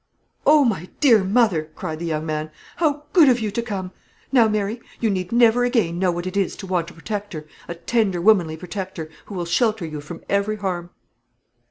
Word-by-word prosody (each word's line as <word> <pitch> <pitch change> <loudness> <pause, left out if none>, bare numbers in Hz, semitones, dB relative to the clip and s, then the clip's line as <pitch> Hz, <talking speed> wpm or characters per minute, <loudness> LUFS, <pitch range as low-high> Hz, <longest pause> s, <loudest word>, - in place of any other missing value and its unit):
"Oh, 300 -2 +6
my 185 -7 -1
dear 235 -9 +5
mother," 190 -6 +2
cried 160 -4 -5
the 170 - -4
young 155 -1 -2
man, 155 0 -3 0.3
"how 295 -3 +1
good 325 -7 +7
of 245 -1 +3
you 215 -2 -2
to 235 - -1
come! 195 -5 -5 0.4
Now, 240 -5 +5
Mary, 215 +2 -1 0.2
you 225 -3 +1
need 185 -2 -3
never 240 0 +4
again 220 -9 +1
know 185 -1 +2
what 175 +1 -4
it 185 +1 -5
is 200 -2 0
to 195 - -8
want 180 -3 -1
a - - -14
protector, 200 -3 -5 0.2
a 170 - -5
tender 195 +1 0
womanly 175 -5 +3
protector, 180 -2 -6 0.2
who 205 - -8
will 175 -2 -2
shelter 215 +2 +1
you 155 -2 -6
from 165 +3 -9
every 200 +2 0
harm." 180 -4 -3
195 Hz, 200 wpm, -22 LUFS, 170-225 Hz, 0.4 s, good